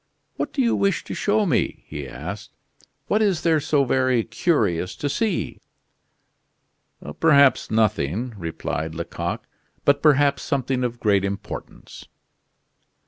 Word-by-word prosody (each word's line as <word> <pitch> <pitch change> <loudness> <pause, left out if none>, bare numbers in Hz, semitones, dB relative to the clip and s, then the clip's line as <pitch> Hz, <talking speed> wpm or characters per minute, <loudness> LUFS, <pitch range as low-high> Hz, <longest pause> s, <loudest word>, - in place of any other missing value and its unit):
"What - - -3
do 270 - 0
you 235 - +2
wish 200 -1 +1
to - - -7
show 210 +1 +1
me?" 155 -10 0
he 75 -3 -7
asked. 90 - -8 0.5
"What 210 +8 +1
is 195 -6 +1
there 160 -2 +3
so 145 -1 +2
very 130 -2 +2
curious 110 - 0
to 145 - -3
see?" 205 +6 -1 1.6
"Perhaps 140 -4 +5
nothing," 110 - 0
replied 80 -3 -4
Lecoq, 85 +1 -4 0.4
"but 140 0 +4
perhaps 145 -2 +4
something 130 -2 -1
of 120 -1 -3
great 100 -4 +2
importance." 100 0 -7
130 Hz, 125 wpm, -23 LUFS, 100-155 Hz, 1.6 s, Perhaps